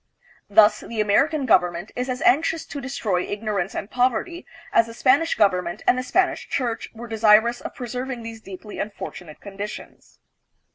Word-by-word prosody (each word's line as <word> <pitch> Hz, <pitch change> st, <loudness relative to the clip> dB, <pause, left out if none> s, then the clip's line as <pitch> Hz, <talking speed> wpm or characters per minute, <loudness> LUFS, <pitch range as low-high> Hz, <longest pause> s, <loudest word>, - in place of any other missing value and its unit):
Thus, 210 Hz, +1 st, +5 dB
the 230 Hz, -, -7 dB
American 275 Hz, +8 st, +2 dB
government 180 Hz, -4 st, +2 dB
is 250 Hz, +1 st, -3 dB
as 255 Hz, 0 st, -3 dB
anxious 315 Hz, +4 st, +2 dB
to 285 Hz, -, -7 dB
destroy 230 Hz, -9 st, -1 dB
ignorance 205 Hz, -2 st, -3 dB
and -, -, -4 dB
pov 250 Hz, 0 st, +3 dB
erty 345 Hz, +9 st, -5 dB, 0.3 s
as 230 Hz, -, +4 dB
the 230 Hz, -, -10 dB
Spanish 280 Hz, +8 st, +3 dB
government 180 Hz, -2 st, +1 dB
and -, -, +4 dB
the 255 Hz, -, -1 dB
Spanish 365 Hz, +9 st, 0 dB
church 240 Hz, -4 st, -2 dB
were 235 Hz, +1 st, -8 dB
desirous 225 Hz, +1 st, +4 dB
of -, -, -7 dB
preserving 250 Hz, 0 st, -5 dB
these 225 Hz, -1 st, -8 dB
deeply 195 Hz, +1 st, -9 dB
unfortunate 190 Hz, -6 st, -7 dB
con 200 Hz, -1 st, -12 dB
ditions. 210 Hz, +1 st, -8 dB
225 Hz, 170 wpm, -23 LUFS, 205-255 Hz, 0.3 s, Thus